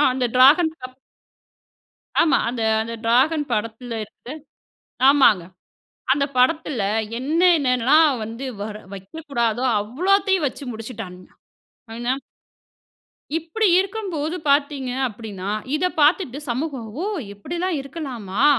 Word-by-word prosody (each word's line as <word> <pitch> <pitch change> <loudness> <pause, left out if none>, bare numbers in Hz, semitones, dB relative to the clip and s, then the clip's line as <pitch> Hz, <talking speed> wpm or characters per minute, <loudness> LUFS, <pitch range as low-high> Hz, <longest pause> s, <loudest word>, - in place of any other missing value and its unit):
அ, - - +5
அந்த 255 -1 0
ட்ராகன் 305 +6 +6
அப் 255 0 -21 1.3
ஆமா. 320 - +3
அந்த 235 -1 -3 0.2
அந்த 230 +1 -6
ட்ராகன் 275 +6 +3
படத்துல 230 +3 -3
இருந்து - - -11 1.0
ஆமாங்க. 260 -10 +5 0.7
அந்த 280 +1 +2
படத்துல 260 -2 +2 0.4
என்ன 300 +7 0 0.2
என்னலாம் 270 +2 +3
வந்து 230 +5 -6 0.2
வர 210 0 -5 0.2
வைக்கக்கூடாதோ 235 +2 -2 0.2
அவ்ளோத்தையும் 370 - +1
வச்சு 280 - -10
முடிச்சிட்டான்னுங்க. 220 -5 -8 0.7
ஆனா 240 +2 -1 1.2
இப்டி 335 +7 0
இருக்கும்போது 370 -5 -2
பாத்தீங்க 280 -2 +1 0.2
அப்டின்னா, 205 -4 -7 0.3
இத 340 - -1 0.2
பாத்துட்டு 295 -2 +3
சமூகம், 260 -1 -3 0.2
"ஓ! - - -2 0.3
இப்படில்லாம் 340 - -3
இருக்கலாமா?" 260 - -3
265 Hz, 105 wpm, -22 LUFS, 230-315 Hz, 1.3 s, ட்ராகன்